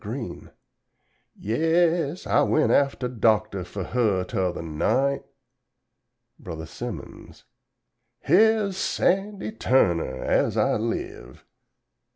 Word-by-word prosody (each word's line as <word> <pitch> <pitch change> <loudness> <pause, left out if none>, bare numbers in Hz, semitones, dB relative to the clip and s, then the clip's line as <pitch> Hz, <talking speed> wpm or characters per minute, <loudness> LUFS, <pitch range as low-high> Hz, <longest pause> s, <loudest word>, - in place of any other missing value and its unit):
Green_ - - -7 0.8
"Yes, 165 - 0
I - - +3
went 155 - +2
aftuh 125 -4 0
Doctuh 105 -4 +2
fuh 95 +2 -6
her 105 -4 0
'tuther 90 -2 -2
night 125 - 0 0.6
" 120 0 -52
Bro. 80 -4 -7
Simmons 80 - -9 0.8
"Here's 205 +3 +3
Sandy 195 +2 0
Turner, 85 - +1
as - - +1
I - - +2
live!" 60 +1 -5
120 Hz, 95 wpm, -25 LUFS, -, 0.8 s, I